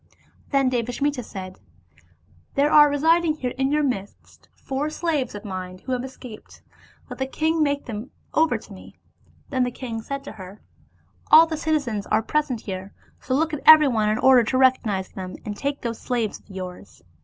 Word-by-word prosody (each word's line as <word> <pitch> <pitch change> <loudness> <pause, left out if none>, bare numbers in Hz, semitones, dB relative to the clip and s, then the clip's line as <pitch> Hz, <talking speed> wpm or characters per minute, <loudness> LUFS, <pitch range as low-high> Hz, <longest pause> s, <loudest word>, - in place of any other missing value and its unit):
Then 275 -2 +2
Devasmita 250 +3 -1
said, 185 -3 -9 0.5
" 85 +1 -34
There 285 +2 +3
are 295 -1 +7
residing 320 +2 +2
here 255 -5 -4
in 265 +1 0
your 300 0 +2
midst 205 -8 -5
four 275 +3 -3
slaves 305 -7 -2
of 205 - -8
mine 185 -2 -6
who 260 - -8
have 250 -1 -1
escaped, 255 -4 -11 0.4
let - - -9
the 265 - -1
king 315 +4 0
make 285 -1 0
them 225 +2 -6 0.2
over 320 +1 +3
to - - -13
me." - - -14 0.5
Then 260 -2 +1
the 245 - 0
king 235 -2 -6
said 275 +4 -5
to - - -8
her, 195 -1 -11 0.4
" - - -34
All 320 +1 +9
the 325 -1 -4
citizens 285 -10 -1
are 215 +1 +1
present 295 -3 -1
here, 190 0 -7 0.3
so 260 - -2
look 320 +3 0
at 300 - -3
everyone 270 -9 +7
in 215 - +1
order 255 -1 +6
to 255 +3 -1
recognize 230 -7 +2
him, 185 -1 -7
and 205 - -4
take 280 +5 -3
those 230 -1 -4
slaves 235 -4 -2
of - - -29
yours." 185 - -9
255 Hz, 190 wpm, -23 LUFS, 210-290 Hz, 0.5 s, All